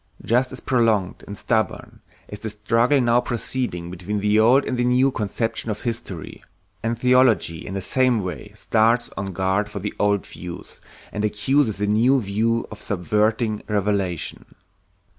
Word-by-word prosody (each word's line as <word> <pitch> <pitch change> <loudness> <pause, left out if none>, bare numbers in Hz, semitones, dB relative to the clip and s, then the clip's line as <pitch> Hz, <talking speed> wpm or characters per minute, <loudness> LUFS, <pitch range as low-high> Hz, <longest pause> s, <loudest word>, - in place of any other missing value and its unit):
Just 125 +4 +2
as - - -6
prolonged 110 -7 +1
and 100 - -7
stubborn 110 -1 -2 0.3
is 105 - -8
the 110 - -4
struggle 115 +6 +2
now 120 -1 +3
proceeding 120 -8 -3
between 95 +4 -3
the 105 +1 +3
old 125 +5 +5
and 125 - -2
the 120 - 0
new 125 +2 +3
conception 115 +1 -2
of 105 -1 -3
history, 115 -8 -5 0.4
and 115 +1 -1
theology 125 -9 +3
in 95 - -5
the 95 - -2
same 125 +1 +2
way 90 -4 -6
stands 115 +2 +2
on 100 0 -4
guard 95 +3 0
for 105 - -7
the 100 +1 -4
old 100 -1 +2
view, 90 -1 -8 0.5
and 105 - -3
accuses 110 +2 +1
the 105 - -1
new 115 +6 +3
view 115 +2 0
of 105 0 -9
subverting 105 +3 0
revelation. 100 -4 -2
110 Hz, 160 wpm, -22 LUFS, 100-120 Hz, 0.5 s, old